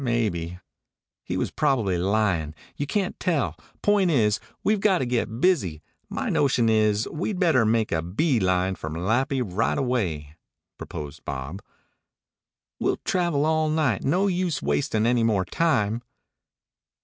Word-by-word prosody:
Maybe 100 Hz, -9 st, -1 dB, 0.3 s
" -, -, -67 dB
"He -, -, -3 dB
was -, -, -1 dB
probably 125 Hz, -11 st, +1 dB
lyin'. 90 Hz, -4 st, 0 dB, 0.2 s
You 145 Hz, -, -3 dB
can't 195 Hz, +3 st, -1 dB
tell. 140 Hz, -, 0 dB, 0.3 s
Point 205 Hz, -3 st, +3 dB
is, 110 Hz, -8 st, +2 dB, 0.2 s
we've 210 Hz, 0 st, +2 dB
got 195 Hz, -2 st, +3 dB
to 130 Hz, -, -1 dB
get 120 Hz, -2 st, -1 dB
busy. 100 Hz, -, +1 dB, 0.3 s
My -, -, -3 dB
notion 125 Hz, -5 st, +2 dB
is 110 Hz, -1 st, +2 dB
we'd 185 Hz, +5 st, -3 dB
better 160 Hz, -, +3 dB
make 110 Hz, -1 st, +1 dB
a 80 Hz, -, +1 dB
bee 115 Hz, -, +1 dB
line 95 Hz, 0 st, +1 dB
for 80 Hz, -, -6 dB
Malapi 115 Hz, -, 0 dB
right 105 Hz, +1 st, 0 dB
away," 85 Hz, -, -2 dB, 0.4 s
proposed 75 Hz, -2 st, -7 dB
Bob. 70 Hz, +7 st, -5 dB, 1.2 s
"We'll -, -, +1 dB
travel 170 Hz, -6 st, +1 dB
all 155 Hz, 0 st, +2 dB
night. 155 Hz, -9 st, +1 dB
No 180 Hz, +8 st, +2 dB
use 180 Hz, -6 st, 0 dB
wastin' 115 Hz, -7 st, 0 dB
any 120 Hz, 0 st, +3 dB
more 105 Hz, -5 st, +2 dB
time." 115 Hz, -, +1 dB
115 Hz, 145 wpm, -25 LUFS, 95-155 Hz, 1.2 s, Point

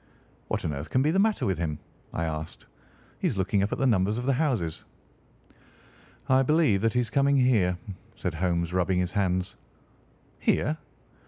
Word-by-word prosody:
"What -, -, -2 dB
on 75 Hz, -, -1 dB
earth 70 Hz, +2 st, -6 dB
can 130 Hz, -, +2 dB
be 150 Hz, -, +2 dB
the 190 Hz, -, +2 dB
matter 215 Hz, +1 st, +2 dB
with 95 Hz, -4 st, 0 dB
him?" 80 Hz, -3 st, -2 dB, 0.3 s
I 85 Hz, -, -2 dB
asked. 80 Hz, -1 st, -5 dB, 0.5 s
"He -, -, +1 dB
is -, -, -2 dB
looking 95 Hz, +1 st, +1 dB
up 100 Hz, -, 0 dB
at -, -, -1 dB
the 135 Hz, -, +1 dB
numbers 105 Hz, -3 st, +2 dB
of 125 Hz, -, -3 dB
the 135 Hz, -, +3 dB
houses." 120 Hz, -, -1 dB, 1.4 s
"I 130 Hz, 0 st, +4 dB
believe 140 Hz, -8 st, +3 dB
that 115 Hz, +1 st, +1 dB
he 125 Hz, -, +2 dB
is 120 Hz, -, -4 dB
coming 140 Hz, 0 st, +3 dB
here," 110 Hz, -9 st, +3 dB, 0.4 s
said -, -, -3 dB
Holmes, 85 Hz, 0 st, -1 dB
rubbing 90 Hz, 0 st, +1 dB
his 90 Hz, -1 st, 0 dB
hands. 95 Hz, -2 st, -1 dB, 0.8 s
"Here?" 155 Hz, +2 st, +1 dB
100 Hz, 180 wpm, -27 LUFS, 90-130 Hz, 1.4 s, I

